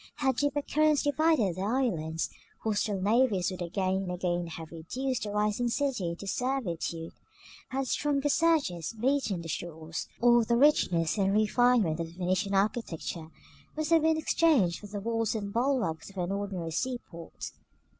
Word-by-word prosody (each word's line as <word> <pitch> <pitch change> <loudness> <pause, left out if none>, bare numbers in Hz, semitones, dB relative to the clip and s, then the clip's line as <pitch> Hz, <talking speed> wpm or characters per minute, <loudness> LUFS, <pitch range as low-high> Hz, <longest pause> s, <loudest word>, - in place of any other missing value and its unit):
Had 265 -4 0
deeper 290 0 0
currents 305 0 +2
divided 290 - +2
their 195 +3 -1
islands, 165 -11 -1 0.3
hostile 205 -2 0
navies 205 -2 +2
would 185 -1 -7
again 185 +2 0
and 190 -2 -3
again 175 -1 -1
have 160 -1 -8
reduced 250 +11 -3
the 210 - -3
rising 210 +3 0
city 245 -8 0
into 170 +4 -6
servitude; 185 -9 -2 0.6
had 265 0 -2
stronger 290 +1 0
surges 280 - +1
beaten 245 -8 0
their - - -7
shores, 160 0 -5
all 240 0 +5
the 235 +1 +1
richness 195 - +3
and 195 0 +2
refinement 215 -5 +3
of 165 - -2
the 165 - -14
Venetian 185 +2 0
architecture 195 -6 -1 0.5
must 310 +1 -2
have 330 -1 +6
been 320 0 +3
exchanged 305 - +3
for 205 - -10
the 205 0 -5
walls 225 +1 -1
and 200 -2 -4
bulwarks 235 - 0
of 195 - -15
an 180 0 -1
ordinary 195 -4 -3
sea 255 +9 -1
port. 170 -1 -8
210 Hz, 160 wpm, -29 LUFS, 175-260 Hz, 0.6 s, have